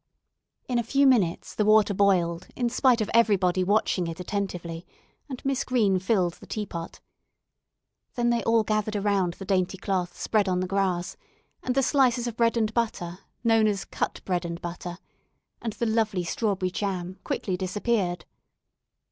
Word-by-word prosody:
In 245 -2 +1
a - - 0
few 275 +5 +2
minutes 215 -11 +2
the 215 - +1
water 215 -1 +5
boiled 180 -3 +2
in 245 -2 0
spite 245 -1 +3
of 215 - -1
everybody 190 -5 +3
watching 190 -2 +1
it 165 +1 -6
attentively, 180 -3 -4 0.5
and 260 -1 -7
Miss 270 -1 0
Green 210 -7 +2
filled 185 -3 +1
the - - -14
teapot. 175 -6 -5 1.2
Then 240 -1 +2
they 235 -1 +1
all 230 +1 +3
gathered 215 0 -1
around 200 -3 +1
the 195 - -8
dainty 185 0 0
cloth 185 -2 -2
spread 210 -3 +1
on 180 -1 +1
the 185 - 0
grass, 185 -2 -1 0.4
and 255 - -2
the 270 - +3
slices 255 -3 +3
of 240 -2 -4
bread 230 0 +2
and 220 -1 0
butter, 185 -7 -2 0.2
known 225 -2 +4
as 200 -2 -1
"cut - - -3
bread 180 -2 0
and 170 0 -5
butter," 175 0 -6 0.6
and 225 -2 -3
the 235 - -2
lovely 220 -4 +1
strawberry 190 0 -1
jam 185 -2 -3
quickly 185 - -2
disappeared. 185 -1 -1
200 Hz, 165 wpm, -26 LUFS, 180-230 Hz, 1.2 s, water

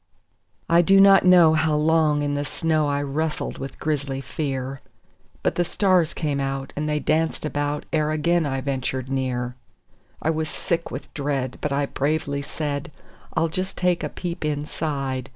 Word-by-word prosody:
I 170 +1 +5
do 195 +3 +5
not 195 -1 +7
know 175 -3 +7
how 155 -1 +2
long 150 -1 +3
in 145 0 -1
the 145 0 -1
snow 155 0 +1
I 145 0 0
wrestled 150 +3 -2
with 135 0 -6
grisly 140 -3 -1
fear; 135 -1 -4 0.6
But - - +2
the 175 - +1
stars 180 -2 +2
came 145 -4 -1
out 135 0 -3
and 150 +1 -2
they 150 0 +1
danced 160 +1 0
about 145 0 -2
ere 155 -1 +2
again 170 +3 +2
I 135 -1 -2
ventured 130 -1 -2
near; 125 -2 -1 0.7
I 160 - +1
was 160 -1 -2
sick 170 -2 -2
with - - -8
dread, 140 -3 -2
but 150 - -1
I 140 +1 +1
bravely 140 0 -1
said: 145 0 -4 0.4
"I'll 165 - +2
just 185 +4 -4
take 180 -1 +1
a - - -2
peep 175 -1 -5
inside. 145 -3 -2
150 Hz, 170 wpm, -24 LUFS, 140-160 Hz, 0.7 s, not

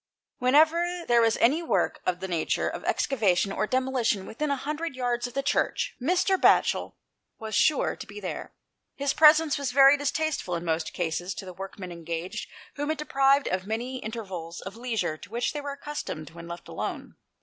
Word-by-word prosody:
Whenever 325 +7 +3
there 240 -1 +5
was 225 -1 +3
any 285 +8 +3
work 205 - 0
of 180 0 0
the 190 - -3
nature 170 -3 0
of - - -5
excavation 200 -7 +1
or 215 - -1
demolition 255 -6 0
within 300 +6 -3
a 280 - +2
hundred 300 +2 -4
yards 245 -1 -1
of 245 - -13
the 275 - 0
Church, - - 0
Mr. 365 +6 +2
Batchel - - +3 0.4
was 220 -1 -7
sure 305 +4 +3
to - - -9
be 200 +1 -9
there. 190 - -5 0.4
His 280 0 0
presence 305 -1 +6
was 275 -3 -2
very 275 +2 +7
distasteful 290 - -1
in 170 +1 -4
most 160 -1 -1
cases, 175 +2 -2
to 195 - -7
the 185 - -8
workmen 190 0 -8
engaged, 170 +4 -5 0.3
whom 290 +1 -2
it 315 - 0
deprived 275 -1 +3
of 185 +1 -2
many 240 +4 -3
intervals 190 -8 -6
of 195 +2 -8
leisure 225 -9 -2
to 200 - -13
which 235 +3 -1
they 295 - -4
were 285 -1 -4
accustomed 280 - -6
when 170 0 -10
left 170 0 -8
alone. - - -5
240 Hz, 185 wpm, -27 LUFS, 185-285 Hz, 0.4 s, very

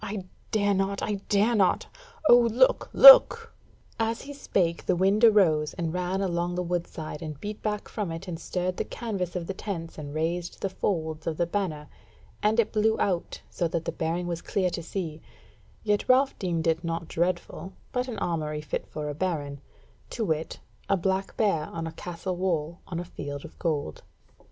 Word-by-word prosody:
I 205 -2 -4 0.3
dare 205 -2 +2
not, 195 +1 -1
I 205 -2 -2
dare 210 +4 +3
not! 195 -5 +2 0.4
O - - +9
look, 245 +2 +3
look!" - - +9 0.5
As 225 0 -1
he 285 - -8
spake 175 -11 -1
the 185 - +3
wind 195 +5 +2
arose 170 -9 +4
and 165 -3 -3
ran 180 +2 -1
along 175 -2 -1
the 180 - -1
wood 175 0 -2
side, 155 -2 -7
and 155 -3 -6
beat 210 0 -6
back 210 -1 -2
from 205 -6 -4
it 165 +4 -7
and 165 -2 -5
stirred 180 +1 -2
the - - 0
canvas 195 -7 -4
of 175 -2 -3
the 195 - -4
tents 170 -6 -6
and 145 -1 -7
raised 170 +2 -2
the 195 - -2
folds 160 -5 -2
of 160 -2 -2
the 175 - +2
banner, 170 -5 -3 0.5
and 220 +1 +3
blew 220 0 +2
it - - -8
out, 180 -4 -1
so 170 - 0
that 165 0 -3
the - - -1
bearing 165 +2 -2
was 170 -1 -3
clear 185 -3 0
to 170 - -4
see; 165 -2 -5 0.6
yet 210 +1 0
Ralph 265 +2 +5
deemed 170 -3 -1
it 165 +1 +1
naught 165 -1 -3
dreadful, 180 +2 -2 0.2
but 250 0 -1
an 245 - -5
armoury 155 -3 -2
fit 150 - -4
for 150 -1 -5
a 145 - -3
baron, 145 -4 -3 0.5
to 225 - -2
wit, 160 -2 -2 0.3
a 195 - +3
black 190 +2 -1
bear 180 -8 +2
on 165 -1 -5
a 165 - -4
castle 175 +2 -5
wall 170 -3 -1
on 170 -2 -4
a 175 - -5
field 145 -4 -7
of - - -13
gold. 145 - -2
180 Hz, 195 wpm, -27 LUFS, 165-205 Hz, 0.6 s, O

